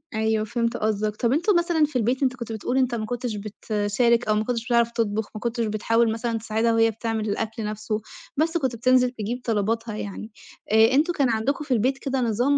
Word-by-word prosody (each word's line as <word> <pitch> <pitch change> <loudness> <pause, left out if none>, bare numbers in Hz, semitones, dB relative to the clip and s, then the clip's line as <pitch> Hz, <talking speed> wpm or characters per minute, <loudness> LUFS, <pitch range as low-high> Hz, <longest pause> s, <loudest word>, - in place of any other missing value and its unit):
أيوه، 220 0 +1
فهمت 230 +1 -1
قصدك. 215 0 -1
طَب 235 +2 0
أنتم 350 +7 +2
مثلًا 340 -3 +2
في 290 - -10
البيت 250 +3 +1
أنت 260 -1 +1
كنت 235 -2 -7
بتقول 225 +3 -3
إن - - +4
أنت 245 -2 0
ما 215 - -3
كنتش 240 -1 -3
بتشارك 215 +3 0
أو 215 - +3
ما 215 - +1
كنتش 235 0 -2
بتعرف 235 -1 +2
تطبُخ، 220 -2 -1
ما - - -4
كنتش 235 -1 -1
بتحاول 225 +2 +1
مثلًا 230 +1 -2
تساعدها 225 +1 0
وهي 225 0 +4
بتعمل 225 -1 -3
الأكل 220 +2 -3
نَفْسه، 215 +1 -3 0.4
بس 325 +3 +2
كنت 265 -6 -1
بتنزل 250 +2 +3
تجيب 240 +1 -4
طلباتها 225 0 -1
يعني. 215 +1 -6 0.4
آآ 220 +2 +6
أنتم 315 +6 +3
كان 275 -5 +2
عندكم 240 +7 0
في 270 - 0
البيت 255 +4 +1
كده 270 -1 -2
نظام 245 +5 +2
230 Hz, 210 wpm, -24 LUFS, 215-250 Hz, 0.4 s, آآ